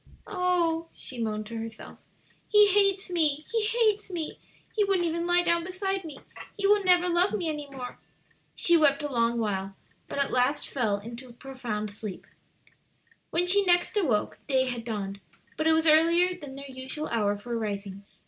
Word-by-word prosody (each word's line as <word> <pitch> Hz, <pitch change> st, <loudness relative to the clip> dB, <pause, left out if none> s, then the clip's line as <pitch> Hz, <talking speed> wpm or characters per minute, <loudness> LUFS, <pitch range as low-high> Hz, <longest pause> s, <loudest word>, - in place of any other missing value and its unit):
"Oh," 350 Hz, -4 st, 0 dB
she 255 Hz, -, -8 dB
moaned 215 Hz, -1 st, -2 dB
to 230 Hz, +1 st, -6 dB
herself, 225 Hz, 0 st, -8 dB, 0.5 s
"he 420 Hz, -1 st, +6 dB
hates 395 Hz, -1 st, +2 dB
me, 305 Hz, -3 st, +1 dB
he 450 Hz, -2 st, +1 dB
hates 435 Hz, -3 st, +1 dB
me! 335 Hz, -4 st, -5 dB, 0.4 s
he 425 Hz, -, +3 dB
wouldn't 390 Hz, -3 st, +1 dB
even 335 Hz, +1 st, -1 dB
lie 350 Hz, 0 st, +4 dB
down 340 Hz, -1 st, +2 dB
beside 385 Hz, +1 st, -2 dB
me! 300 Hz, -4 st, -8 dB, 0.4 s
he 400 Hz, -, -2 dB
will 410 Hz, 0 st, +4 dB
never 360 Hz, -1 st, +4 dB
love 355 Hz, +2 st, +2 dB
me 370 Hz, -6 st, -1 dB
any 295 Hz, -2 st, -5 dB
more." 255 Hz, -3 st, -8 dB, 0.6 s
She 345 Hz, -, +4 dB
wept 295 Hz, -3 st, +4 dB
a 290 Hz, -, -3 dB
long 235 Hz, -1 st, +1 dB
while, 195 Hz, -3 st, -2 dB, 0.3 s
but -, -, -6 dB
at 280 Hz, -1 st, 0 dB
last 255 Hz, +4 st, +1 dB
fell 220 Hz, -7 st, 0 dB
into 235 Hz, +5 st, -9 dB
a -, -, -13 dB
profound 235 Hz, -5 st, -5 dB
sleep. 205 Hz, -2 st, -7 dB, 1.0 s
When 345 Hz, +2 st, +1 dB
she 400 Hz, +3 st, +4 dB
next 355 Hz, +2 st, +2 dB
awoke 270 Hz, -, 0 dB
day 260 Hz, -2 st, +2 dB
had 245 Hz, -3 st, -4 dB
dawned, 200 Hz, -3 st, -4 dB, 0.4 s
but 315 Hz, -, 0 dB
it 320 Hz, -, +5 dB
was 320 Hz, 0 st, +2 dB
earlier 335 Hz, +3 st, +5 dB
than 290 Hz, -6 st, -10 dB
their 275 Hz, 0 st, -8 dB
usual 265 Hz, +3 st, -5 dB
hour 205 Hz, -3 st, +1 dB
for 235 Hz, +3 st, -5 dB
rising. 200 Hz, -3 st, -4 dB
300 Hz, 180 wpm, -27 LUFS, 235-360 Hz, 1.0 s, he